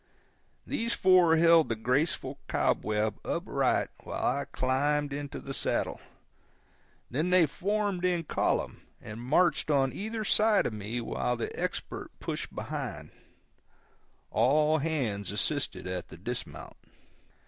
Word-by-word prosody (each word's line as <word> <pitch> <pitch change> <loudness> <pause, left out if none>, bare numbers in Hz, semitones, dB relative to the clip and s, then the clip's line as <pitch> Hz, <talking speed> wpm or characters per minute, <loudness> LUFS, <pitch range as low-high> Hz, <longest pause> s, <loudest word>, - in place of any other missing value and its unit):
These 235 +1 -1
four 180 -3 +5
held 165 -1 +6
the 115 - 0
graceful 130 +8 0
cobweb 105 0 0
upright - - 0
while - - -4
I 140 - -3
climbed 140 +2 0
into 145 0 -5
the 135 - -7
saddle; - - -1 1.1
then 155 +8 0
they 180 -2 +6
formed 200 +3 -1
in 175 -2 +1
column - - -1 0.2
and 105 +2 -8
marched 155 +7 +2
on 135 -3 +2
either 220 +1 -4
side 215 0 +4
of 115 - -1
me 110 +3 -4
while 125 +1 -1
the 115 - -4
Expert - - -4
pushed - - -5
behind; - - -5 1.2
all 150 +7 +3
hands 125 - -1
assisted - - -1
at 90 -1 -4
the 80 - -12
dismount. 85 - -6
145 Hz, 125 wpm, -29 LUFS, 120-170 Hz, 1.2 s, held